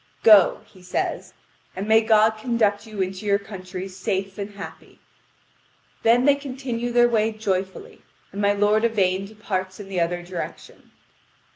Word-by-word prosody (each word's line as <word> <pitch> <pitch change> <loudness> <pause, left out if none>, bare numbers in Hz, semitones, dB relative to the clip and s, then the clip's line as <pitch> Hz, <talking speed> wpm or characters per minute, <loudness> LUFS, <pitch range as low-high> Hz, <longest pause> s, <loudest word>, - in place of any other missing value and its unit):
"Go," 210 -5 +6
he 185 - -19
says, 180 0 -3 0.4
"and 195 +3 -4
may 220 +1 +5
God 220 0 +4
conduct 220 -2 0
you 210 -3 -2
into 185 +2 -6
your 200 -1 +2
countries 190 -2 -8
safe 195 0 -3
and 200 0 -4
happy." 200 - -10 1.0
Then 240 +3 +4
they 285 - +6
continue 255 -4 -4
their 240 0 +5
way 225 -2 +1
joyfully; 200 - -4 0.3
and 200 - -5
my 200 0 +3
lord 210 +2 +2
Yvain 195 -4 +1
departs 190 -3 -5
in 200 -2 -9
the 190 -2 -2
other 175 +1 -1
direction. 175 -1 -8
205 Hz, 150 wpm, -23 LUFS, 190-225 Hz, 1.0 s, Go